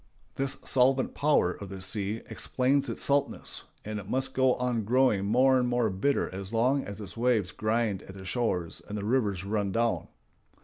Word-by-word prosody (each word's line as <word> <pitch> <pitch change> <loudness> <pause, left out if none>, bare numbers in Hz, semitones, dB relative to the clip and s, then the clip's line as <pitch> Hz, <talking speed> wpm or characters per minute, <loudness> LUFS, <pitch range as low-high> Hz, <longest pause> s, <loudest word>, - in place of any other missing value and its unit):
This 135 0 -2
solvent 130 0 +3
power 145 -11 +2
of 100 - -9
the 95 0 -7
sea 100 +3 -2
explains 135 +2 0
its - - -1
saltness, 140 0 0 0.2
and 105 0 -4
it 100 0 -10
must 130 0 0
go 130 -1 +3
on 125 -3 -1
growing 115 -3 +2
more 130 +5 +4
and 125 -1 0
more 120 -3 +1
bitter 135 +10 +1
as 95 +1 -6
long 125 +5 +2
as 100 +1 -8
its 105 - -8
waves 115 -6 +1
grind 110 -2 0
at 95 - -11
the 95 -1 -10
shores 90 -5 -2
and 105 - -5
the 100 - -4
rivers 105 -6 0
run 100 -1 -1
down. 115 +2 0
115 Hz, 185 wpm, -28 LUFS, 100-130 Hz, 0.2 s, more